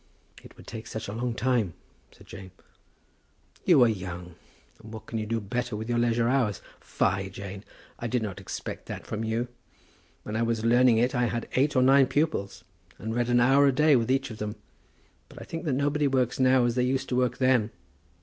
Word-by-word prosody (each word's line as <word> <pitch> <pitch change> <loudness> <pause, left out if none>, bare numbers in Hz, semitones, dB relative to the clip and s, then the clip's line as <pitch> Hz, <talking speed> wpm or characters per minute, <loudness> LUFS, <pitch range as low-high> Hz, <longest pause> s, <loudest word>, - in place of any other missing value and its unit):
"It - - -16
would - - -14
take 110 0 -8
such 110 - -6
a 100 - -5
long 120 +1 -2
time," 115 -7 0 0.4
said - - -18
Jane. 95 -1 -10 1.2
"You 155 -8 +6
are - - +5
young, 90 -4 -5 0.5
and 110 0 -12
what 110 -1 -9
can 115 - -4
you 110 - -4
do 115 +1 -1
better 120 +3 -3
with 110 +1 -5
your 120 0 +1
leisure 120 0 +2
hours? 120 -6 +1 0.2
Fie, - - -1
Jane! 100 0 -8 0.4
I 120 - -3
did 120 0 -1
not 100 -3 -5
expect 95 - -7
that - - -7
from 110 +1 -4
you. 115 +2 -1 0.8
When 105 - -5
I 110 - 0
was 115 -1 -1
learning 120 0 +5
it 125 +4 +2
I 125 -2 +1
had 115 0 -3
eight 140 +3 +2
or 130 - +4
nine 135 0 +6
pupils, 100 - -1 0.3
and 110 +1 -5
read 120 +1 0
an 120 0 +4
hour 135 +4 +5
a - - +5
day 150 +2 +4
with 115 -2 +1
each 135 -1 0
of 110 - -9
them. 105 0 -4 0.7
But - - -12
I - - -9
think 165 +2 -6
that 150 - 0
nobody 145 +2 +1
works 130 -2 0
now 130 -1 +4
as 120 - +1
they 125 +1 +1
used 130 +1 0
to 125 - -1
work 125 -1 +1
then. 130 -4 +2
120 Hz, 215 wpm, -27 LUFS, 110-130 Hz, 1.2 s, You